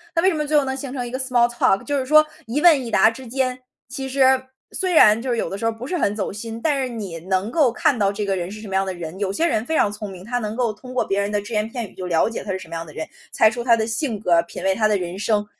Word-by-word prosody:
那 330 - +3
为 375 - +4
什 - - 0
么 300 -2 -2
最 300 +1 +3
后 290 - +4
能 265 0 -2
形 270 -1 -6
成 250 -3 -3
一 240 - -7
个 260 - -3
small 245 -2 +2
talk， 220 -5 +2
就 285 -1 -1
是 260 - -3
说 310 +3 +6 0.2
一 270 +7 -1
问 310 -7 +5
一 - - -5
答 220 +1 +5
之 255 +2 -10
间， 255 +1 -1 0.3
其 270 0 -5
实 265 -1 +3 0.3
虽 370 -2 -1
然 220 -8 +6
就 260 - -4
是 240 - +1
有 230 - -2
的 195 - -5
时 225 - -4
候 225 - +1
不 225 +3 -8
是 360 +7 -2
很 205 -9 0
走 205 -3 -2
心， 225 +2 -7
但 290 -3 +1
是 260 - -1
你 205 -8 -6
能 190 +3 0
够 290 -2 +4
看 245 +1 +1
到 200 0 +2
这 205 +1 -3
个 195 - 0
人 180 -1 -3
是 215 +1 -9
什 220 - -9
么 190 - -6
样 195 0 +2
的 190 - -3
人。 175 +1 -7
有 200 -2 -1
些 325 - +1
人 225 -9 0
非 320 - -2
常 205 - +3
聪 210 0 -6
明， 185 -1 -10
他 245 +3 -2
能 215 -2 -3
够 240 -2 0
通 250 +5 -11
过 255 - +1
别 195 - 0
人 200 0 0
的 205 0 -1
只 205 - -11
言 215 -1 0
片 230 -3 -6
语 - - -20
就 185 - -6
了 170 +3 +2
解 230 - -6
他 205 - -3
是 - - -2
什 170 -3 -12
么 165 - -9
样 165 0 -4
的 155 - -13
人， 160 - -4 0.3
猜 220 - +5
出 240 0 -4
他 235 -1 +4
的 220 -1 -1
性 225 +1 -2
格， 175 -5 +3
品 170 - -9
味 190 0 +2
他 215 +1 +2
的 210 - +2
人 180 0 -5
生。 210 -1 +1
225 Hz, 390 characters per minute, -22 LUFS, 200-260 Hz, 0.3 s, 说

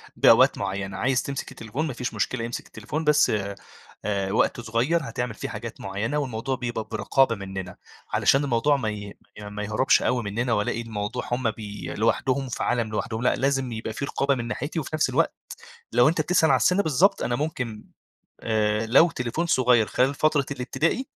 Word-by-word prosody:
بأوقات - - +6
معيّنة، 100 -1 -3
عايز 130 +4 +1
تمسك 140 0 -5
التليفون 130 +8 -4
ما 135 - -4
فيش 125 +1 -4
مشكلة 115 -3 -1
إمسك 120 - -5
التليفون 150 +9 -5
بس 150 -1 +4 0.8
آآ، 100 -2 -1
وقت 115 +2 +1
صغيّر 120 +9 +1
هتعمل 120 -1 -3
فيه - - -6
حاجات - - -7
معيّنة 105 +9 -2
والموضوع 130 -1 -2
بيبقى 120 -3 -3
برقابة 115 +3 +2
مننا، 95 -2 -6 0.4
علشان 135 +2 +4
الموضوع 140 +2 +2
ما 110 -5 -2
ي 105 -1 -7 0.2
ما 105 0 -6
يهربش 110 +5 +3
أوي 125 -2 0
مننا 115 +4 -1
وألاقي 105 +2 0
الموضوع 115 +1 -4
هم 120 -2 +1
بي 105 -2 -7
لوحدهم 130 +4 +1
في - - -3
عالم 120 -3 0
لوحدهم، 110 +1 -3
لأ - - +3
لازم 135 -2 0
يبقى 110 0 -4
في 140 - -3
رقابة 140 -1 0
من 120 -1 -4
ناحيتي، 145 +7 -3
وفي 150 - -5
نفس 155 - +2
الوقت - - +1 0.6
لو 120 +4 +5
أنت 160 0 0
بتسأل 160 0 +3
على - - +6
السن 190 +3 +3
بالضبط 160 +6 +3
أنا 120 - 0
ممكن 125 -8 -4 0.6
آآ، 110 0 +1
لو 160 +8 +6
تليفون 125 +5 -2
صغيّر 125 -7 +4
خلال 130 +2 +2
فترة 150 -3 +2
الابتدائي 150 - -1
120 Hz, 180 wpm, -25 LUFS, 110-140 Hz, 0.8 s, بأوقات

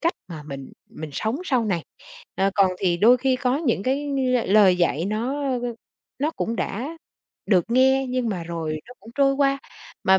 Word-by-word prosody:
cách 335 +1 +2 0.2
mà 160 -4 -7
mình 140 -2 -8 0.2
mình 155 -1 -8
sống 220 - -1
sau 255 -8 +1
này. 180 -6 -1 0.5
Ờ, 195 +1 +1
còn 195 -2 +4
thì 175 -3 +1
đôi 230 +7 +6
khi 260 +1 +1
có 255 0 0
những 270 - 0
cái, 270 +5 0
ưm, 260 -4 0
lời 200 -4 +6
dạy 170 -2 +1
nó, 235 +8 -2
ơ, 260 -3 -1
ơ, 240 -1 -3 0.4
nó 295 +4 0
cũng 230 -7 -3
đã 275 +13 -3 0.5
được 185 -5 +3
nghe 265 +2 +4
nhưng 250 -2 -1
mà 185 -5 -3
rồi 165 -2 -4
nó 245 - -11
cũng 220 - -13
trôi 275 -1 +3
qua, 275 0 +2 0.5
mà 190 0 +5
235 Hz, 200 wpm, -23 LUFS, 190-270 Hz, 0.5 s, đôi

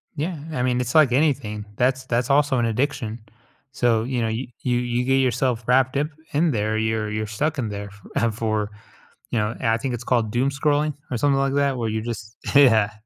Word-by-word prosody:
Yeah, 160 +1 -3
I 125 - -1
mean, 125 -1 +1
it's 125 +5 -4
like 150 -6 +6
anything, 125 -7 0
that's 130 +2 +1
that's 120 +1 0
also 140 -1 +3
an 120 - +2
addiction. 115 -1 -1 0.5
So, 115 -5 +2
you 125 -1 -2
know, 115 - 0
you 115 +4 -3
you 125 -1 +1
you 120 0 -1
get 135 +1 +2
yourself 125 -2 +1
wrapped 130 +1 +3
up 150 +1 +1 0.3
in 160 +2 +3
there, 110 -1 0
you're 110 -1 -1
you're 110 0 -2
stuck 150 +9 -1
in 110 -4 -2
there 100 0 -5
f 100 0 -16 0.2
ah, 115 - +3
for 110 -1 -2 0.6
you 115 - +1
know, 105 +2 -1
I 115 -2 +2
think 125 +1 -3
it's 120 0 -5
called 115 -4 +1
doom 125 +4 +1
scrolling 145 +2 +1 0.2
or 125 - 0
something 140 +2 +2
like 135 0 +1
that 140 -2 +1
where 115 -2 -1
you 110 0 -2
just 110 -1 -6 0.2
yeah. 110 -7 +6
120 Hz, 215 wpm, -23 LUFS, 110-135 Hz, 0.6 s, like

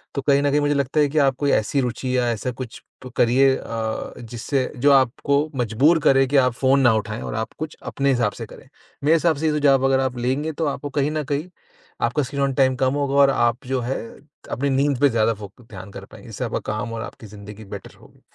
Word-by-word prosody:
तो 140 - -1
कहीं 140 0 +3
न 145 - +2
कहीं 145 - +3
मुझे 145 0 +1
लगता 140 +2 0
है 145 - +4
कि 155 - -4
आप 135 -2 +3
कोई 145 -1 +1
ऐसी 135 +6 +1
रुचि 125 +1 -2
या 120 -1 +1
ऐसा 115 +3 -3
कुछ 125 -1 -8 0.2
प - - -7
करिए 130 +3 +4
अ, 110 -1 -4
जिससे 120 +3 -3
जो 140 +4 +4
आपको 140 +3 +2
मजबूर 130 +8 +3
करे 135 0 +5
कि 140 +2 +2
आप 125 -2 +3
फ़ोन 135 +3 +2
ना 120 -3 +5
उठाएँ 110 +1 -3
और - - -5
आप 110 0 -4
कुछ 155 0 -6
अपने 140 0 -1
हिसाब 120 -5 +1
से - - -7
करें। - - -14 0.4
मेरे 155 +3 +4
हिसाब 165 -1 +2
से 160 - -3
ये - - +2
तो 150 - 0
जब 135 -1 +4
अगर 135 0 +3
आप 130 -2 -2
लेंगे 130 +6 -1
तो 160 +2 -2
आपको 145 0 -4
कहीं 145 +2 +1
न 155 -1 -2
कहीं 150 +6 -2 0.5
आपका 125 +5 +1
स्क्रीन 140 +2 -4
ऑन 135 -1 0
टाइम 130 -1 +3
कम 130 0 +1
होगा 140 -1 -1
और 140 -1 +6
आप 120 -1 +1
जो 130 -1 -1
है 125 +3 -2 0.5
अपनी 140 +2 -1
नींद 135 -1 +1
पे 145 - +6
ज़्यादा 115 -1 +2
फोकस 105 +3 -12
ध्यान 95 -1 -10
कर - - -9
पाएँगे। - - -14
इससे - - -4
आपका - - -2
काम 110 +2 -4
और 115 - -4
आपकी 110 - -10
ज़िन्दगी 105 +1 -11
बेटर - - -9
होगी। - - -20
130 Hz, 245 wpm, -22 LUFS, 120-140 Hz, 0.5 s, और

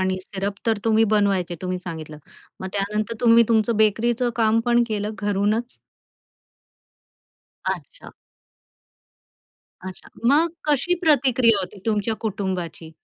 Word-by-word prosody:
आणि 185 0 0
सिरप 195 +1 -4
तर 220 -2 +2
तुम्ही 225 0 +4
बनवायचे 195 -4 +1
तुम्ही 185 0 -2
सांगितलं. 160 -4 -8 0.4
मग 190 - -4
त्यानंतर 210 +3 -2
तुम्ही 235 -1 +6
तुमचं 225 0 +2
बेकरीचं 235 +3 +2
काम 225 -1 +3
पण 240 0 +3
केलं 210 -2 -2
घरूनच? 205 +4 -1 1.9
अच्छा. - - -5 1.7
अच्छा, 185 -1 -9 0.2
मग 305 +6 +4 0.2
कशी 300 +5 +2
प्रतिक्रिया 255 - +3
होती 195 +2 -7
तुमच्या 220 0 0
कुटुंबाची? 185 -5 -4
215 Hz, 110 wpm, -22 LUFS, 195-235 Hz, 1.9 s, तुम्ही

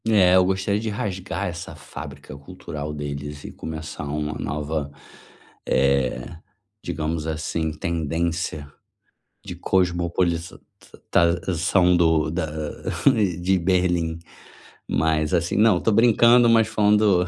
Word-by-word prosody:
É, 95 -5 +5
eu 95 - +6
gostaria 95 +2 0
de 110 0 -3
rasgar 100 -2 -3
essa 85 -1 -7
fábrica 70 -1 -10
cultural 75 -1 -7
deles 75 0 -6
e - - -8
começar 80 -1 -7
uma 75 +1 -3
nova, 75 +1 -3 0.8
eh, 65 -2 +1 0.6
digamos 80 -1 -3
assim, 80 0 -2
tendência 80 -1 -2 0.8
de - - -7
cosmopolização 85 0 0 0.3
da 85 0 -1 1.0
de 95 +2 +2
Berlim. 90 -2 0 0.7
Mas 80 +1 0
assim, 85 -1 0
não, 105 -3 +5
estou 110 +5 +1
brincando, 120 +2 +5
mas 115 -1 +4
falando 105 -4 +3
85 Hz, 100 wpm, -23 LUFS, 75-95 Hz, 1.0 s, eu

